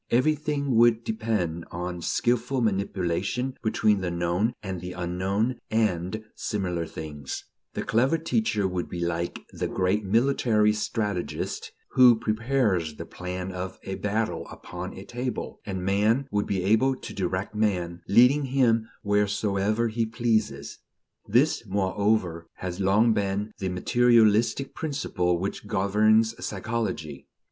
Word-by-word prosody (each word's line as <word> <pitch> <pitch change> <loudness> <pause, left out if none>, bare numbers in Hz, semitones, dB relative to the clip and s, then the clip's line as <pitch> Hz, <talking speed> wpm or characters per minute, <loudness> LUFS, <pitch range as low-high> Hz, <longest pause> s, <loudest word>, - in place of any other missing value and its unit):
Everything 140 +1 +1
would 115 0 +5
depend 105 -8 -1
on 90 0 -5
skilful 125 +7 0
manipulation 100 +3 -1
between 110 -2 +2
the 90 - -1
known 85 +6 0
and 95 -3 -4
the 90 0 -6
unknown 95 +7 -1
and 110 -1 0
similar 90 -5 -2
things: 75 -4 -6 0.3
the - - -2
clever 130 +8 +2
teacher 160 - 0
would 90 -1 -3
be 90 - -5
like 85 0 -2
the - - -2
great 95 +3 0
military 110 0 +3
strategist, 105 -3 -3 0.2
who 125 -3 +7
prepares 110 - 0
the - - -7
plan 90 +1 -5
of 90 0 -5
a 95 - -4
battle 110 +3 -2
upon 90 +1 -7
a 95 - -9
table; 125 -1 -4
and 95 -2 -3
man 105 +7 +2
would 105 0 0
be 95 -2 -1
able 110 +7 +3
to - - -9
direct 95 +2 -2
man, 90 -5 -1
leading 125 +7 +5
him 120 -4 +2
wheresoever 105 +1 +1
he 115 0 -1
pleases. 110 - -1 0.5
This, 125 +5 +3
moreover, 95 -3 0
has 90 0 -5
long 105 +4 +4
been 100 +1 -1
the 95 - -1
materialistic 115 +5 +3
principle 90 - -1
which 100 +3 -4
governs 110 +3 +3
psychology. 100 -9 -3
105 Hz, 130 wpm, -26 LUFS, 90-115 Hz, 0.5 s, who